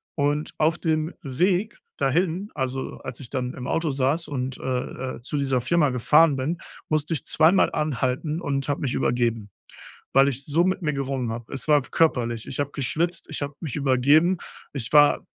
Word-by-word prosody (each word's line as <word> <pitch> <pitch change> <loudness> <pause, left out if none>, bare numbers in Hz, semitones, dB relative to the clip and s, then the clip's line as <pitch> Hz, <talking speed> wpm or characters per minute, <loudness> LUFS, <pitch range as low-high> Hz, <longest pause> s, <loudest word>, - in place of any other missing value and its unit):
Und, 145 +1 0
auf 160 +2 +2
dem 160 0 -1
Weg 180 - 0 0.2
dahin, 175 +8 0
also, 130 -1 -3
als 130 -2 -7
ich 130 -4 -9
dann 125 -2 -3
im 125 - -6
Auto 165 -1 0
saß 140 +5 0
und, 130 -2 -3
äh, 130 0 -3
äh - - -12
zu 130 - -5
dieser 135 -3 +1
Firma 150 +4 +2
gefahren 145 +4 +4
bin, 155 +6 -2 0.3
musste 155 +1 0
ich 150 - -2
2-mal 160 +5 +4
anhalten 150 +1 -1
und 140 -5 -2
habe 145 - -1
mich 130 -4 -1
übergeben, 115 -4 0 0.6
weil 135 +1 +6
ich 135 0 -2
so 155 +5 +2
mit 185 +1 0
mir 150 -2 0
gerungen 135 -3 -2
habe. 115 0 -7
Es 135 - -5
war 150 -1 +6
körperlich. 120 -6 0
Ich - - -5
habe 145 0 -1
geschwitzt, 165 +5 -1
ich 155 - -5
habe 145 0 -4
mich 155 -8 -4
übergeben, 145 +6 +3 0.3
ich 125 -5 -4
war 145 -1 +5
140 Hz, 185 wpm, -24 LUFS, 130-160 Hz, 0.6 s, weil